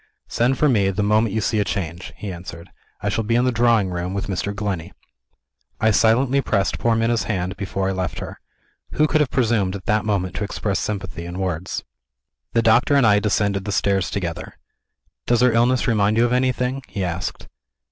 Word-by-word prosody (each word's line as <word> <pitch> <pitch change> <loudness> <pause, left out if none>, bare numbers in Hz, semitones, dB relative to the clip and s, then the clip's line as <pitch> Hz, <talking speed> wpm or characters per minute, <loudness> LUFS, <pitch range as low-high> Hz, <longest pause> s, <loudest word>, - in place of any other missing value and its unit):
"Send 125 +3 +1
for 150 - +3
me, 105 -8 +3
the 100 +2 -1
moment 105 +1 +2
you 110 - +1
see 105 +1 0
a - - +3
change," 85 -4 -4
he 100 -3 -5
answered; 85 -1 -10 0.3
"I 100 - -1
shall 110 +2 -1
be 115 +2 0
in 120 +1 +3
the 130 - +2
drawing 115 -5 +2
room, 90 +2 -3
with 100 - -2
Mr. 100 +1 -2
Glenney." 100 -5 -4 0.9
I 110 -1 +3
silently 125 +6 +3
pressed 100 -6 0
poor 115 -1 +2
Minna's 115 +1 +1
hand, 95 -3 -2
before 95 -1 -3
I - - 0
left 95 -3 -3
her. - - -7 0.5
Who 155 - +3
could 155 0 +2
have 145 - +1
presumed, 110 -7 +1
at 95 - -8
that 105 -2 +1
moment, 100 -4 -1
to - - -2
express 100 0 -2
sympathy 95 -5 -4
in 85 +1 -6
words? 95 -1 -3 0.7
The 115 - +2
doctor 120 +6 +4
and 140 -3 +4
I 105 -2 +5
descended 100 -2 0
the 105 - -2
stairs 100 -2 +1
together. 90 +1 -5 0.7
"Does 120 -1 +3
her 125 -1 +5
illness 120 +2 +2
remind 110 -2 +2
you 115 - +4
of 120 - 0
anything?" 130 +1 0
he 100 - -4
asked. 85 -1 -4
105 Hz, 200 wpm, -21 LUFS, 95-115 Hz, 0.9 s, I